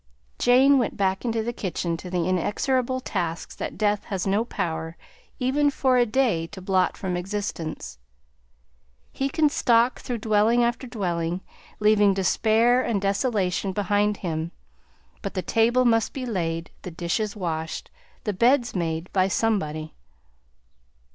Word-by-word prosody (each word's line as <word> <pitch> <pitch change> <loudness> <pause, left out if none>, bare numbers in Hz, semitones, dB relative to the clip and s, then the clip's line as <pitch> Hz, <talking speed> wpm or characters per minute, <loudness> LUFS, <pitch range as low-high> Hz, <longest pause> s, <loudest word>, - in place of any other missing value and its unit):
Jane 265 +3 +5
went 240 - -1
back 190 -1 0
into 225 -1 0
the 240 +2 -3
kitchen 175 -5 -2
to 180 - -8
the 175 -2 -1
inexorable 255 +8 0
tasks 170 -8 -3
that - - -5
death 210 -1 +1
has 190 -3 -3
no 200 +3 +2
power, 165 -7 -4 0.4
even 285 +3 +2
for 265 -2 +1
a 240 -1 +4
day, 215 -9 +1
to 195 +2 -10
blot 185 0 +1
from 185 -2 -3
existence. 175 - -4 1.1
He 270 +1 -2
can 305 +2 +3
stalk 240 -3 +2
through 245 - -4
dwelling 220 +2 +3
after 240 +2 -1
dwelling, 175 -6 -2 0.4
leaving 210 -2 +4
despair 225 +5 +3
and 230 -5 0
desolation 195 -2 0
behind 205 +1 +1
him, 160 0 -2 0.7
but 200 - -5
the 185 - -1
table 240 +3 +3
must 225 -2 +2
be 260 -2 -4
laid, 165 -7 -2
the - - -6
dishes 180 +5 -2
washed, 160 -4 -4 0.3
the 210 - -1
beds 240 +4 +3
made, 165 -1 -2
by 185 -1 +3
somebody. 160 -8 -1
205 Hz, 140 wpm, -25 LUFS, 180-235 Hz, 1.1 s, Jane